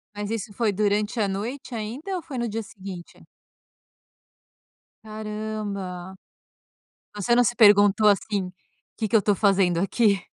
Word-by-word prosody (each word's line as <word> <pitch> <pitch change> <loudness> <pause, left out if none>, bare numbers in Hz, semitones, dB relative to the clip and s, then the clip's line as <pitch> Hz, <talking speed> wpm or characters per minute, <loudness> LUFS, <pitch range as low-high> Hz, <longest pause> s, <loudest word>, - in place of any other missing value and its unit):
Mas 205 +1 -4
isso 220 -1 -4
foi 225 -2 +1
durante 210 +3 0
a 205 - +2
noite 235 +7 -5
ainda 250 - -4
ou 355 - -3
foi 290 -6 -8
no 235 - -1
dia 225 0 -3
seguinte? 190 -4 -10 1.8
Caramba. 210 -4 -5 1.0
Você 210 +3 +1
não 245 - +5
se 240 - 0
perguntou, 205 -1 +6
assim, 200 -2 0 0.5
"que 220 - -2
que 220 - +3
eu 210 - +3
tô 205 +1 +2
fazendo 195 -4 +2
aqui?"? 200 0 +2
210 Hz, 140 wpm, -24 LUFS, 195-225 Hz, 1.8 s, perguntou